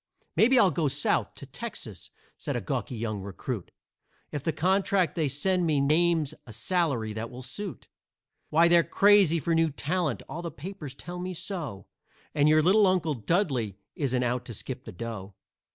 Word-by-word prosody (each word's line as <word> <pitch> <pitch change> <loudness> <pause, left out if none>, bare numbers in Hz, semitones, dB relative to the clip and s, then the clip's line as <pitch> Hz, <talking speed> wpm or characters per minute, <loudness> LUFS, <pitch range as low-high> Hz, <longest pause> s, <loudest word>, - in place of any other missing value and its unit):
"Maybe 255 +4 +5
I'll 200 -6 +6
go 155 0 0
South 140 +2 +1
to - - -10
Texas," - - -7 0.3
said - - -4
a - - 0
gawky 125 - -3
young 110 -3 -3
recruit, 95 -2 -5 0.6
"If 145 - -3
the 160 - +1
contract 185 +1 +2
that 165 - -2
they 155 - +2
send 175 +6 +1
me 150 -3 +2
names 155 +1 +2
a 110 - -9
salary 125 - 0
that 110 +2 -4
will 125 +1 -9
suit. 190 +9 -6 0.6
Why, 165 +2 +5
they're 170 0 +6
crazy 195 -5 +5
for 165 +3 0
new 165 0 +3
talent; 155 - -2
all 170 - -5
the 170 - -4
papers 155 -3 -8
tell 175 +5 -7
me 180 0 -4
so, 155 - -4 0.5
And 150 0 +4
your 155 0 +5
little 200 +4 +5
Uncle 175 -4 +1
Dudley 125 - 0 0.2
isn't 130 -4 0
out 125 0 -1
to 120 - -7
skip 130 +5 -6
the 110 - -7
dough. 100 -1 -7
155 Hz, 180 wpm, -28 LUFS, 125-180 Hz, 0.6 s, I'll